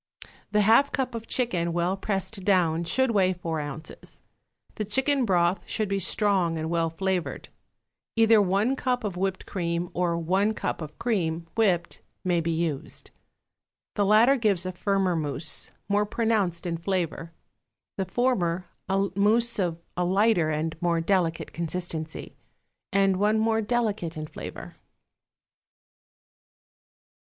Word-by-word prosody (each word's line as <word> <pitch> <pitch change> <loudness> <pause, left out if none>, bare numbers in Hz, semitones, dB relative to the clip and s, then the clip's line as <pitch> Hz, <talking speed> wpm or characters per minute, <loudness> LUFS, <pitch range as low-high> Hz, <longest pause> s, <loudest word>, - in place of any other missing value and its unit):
The 210 - +3
half 230 +7 +5
cup 260 -3 -1
of 230 -1 -6
chicken, 175 -9 0
well 175 +2 +1
pressed 195 0 -3
down, 170 -4 +2
should 260 +9 +3
weigh 190 -4 +3
four 165 -3 -3
ounces. 145 +1 -8 0.5
The 215 - -3
chicken 265 +5 +1
broth 175 -2 +2
should 215 -2 -1
be 195 0 -1
strong 190 -3 +1
and 160 +1 -3
well 165 -1 +1
flavored. 185 +1 -2 0.7
Either 225 -1 +6
one 200 +7 +2
cup 250 -2 -1
of 200 -4 -3
whipped 190 +1 -2
cream, 170 -1 -2
or 175 -1 0
one 190 +6 +1
cup - - -3
of 155 -1 -8
cream, 170 -9 -1
whipped, 185 -7 +1 0.2
may 175 -2 +1
be 165 - -2
used. 160 -4 -3 0.8
The 205 - +1
latter 220 +7 +5
gives 200 -7 +1
a 185 - -2
firmer 190 -1 0
mousse, 155 0 -2 0.2
more 205 +1 +1
pronounced 205 -7 0
in 170 -1 -2
flavor; 170 -2 -2 0.7
the 190 - -1
former, 185 -5 0 0.2
a 195 +1 +1
mousse 230 +3 +2
of 175 -4 0 0.2
a 180 - 0
lighter 190 -2 +3
and 155 +1 -1
more 170 -1 +2
delicate 165 -2 0
consistency, 165 -2 -5 0.6
and 195 -1 +3
one 210 +3 +2
more 225 0 +2
delicate 210 -8 -1
in 155 - -4
flavor. - - -9
190 Hz, 140 wpm, -26 LUFS, 170-215 Hz, 0.8 s, Either